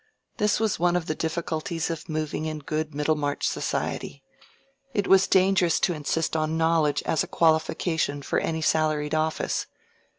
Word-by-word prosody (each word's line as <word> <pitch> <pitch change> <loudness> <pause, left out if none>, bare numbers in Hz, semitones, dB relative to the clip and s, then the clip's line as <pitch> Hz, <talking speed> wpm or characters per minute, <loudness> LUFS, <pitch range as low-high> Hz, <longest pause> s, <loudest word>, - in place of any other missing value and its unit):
This 210 0 +2
was 220 -2 0
one 175 0 +2
of 175 -2 0
the 155 - -1
difficulties 165 +1 -2
of 165 -1 -6
moving 155 0 -2
in 155 0 -3
good 155 +1 -4
Middlemarch 150 -1 0
society: 140 - -3 0.7
it 205 -2 +1
was 195 0 +5
dangerous 185 -3 +3
to 180 - +2
insist 160 +1 -1
on 155 0 0
knowledge 160 -3 +2
as 160 - +1
a - - -6
qualification 160 -2 +1
for - - 0
any 160 0 -2
salaried 155 -2 +1
office. 155 0 -1
160 Hz, 155 wpm, -26 LUFS, 155-170 Hz, 0.7 s, was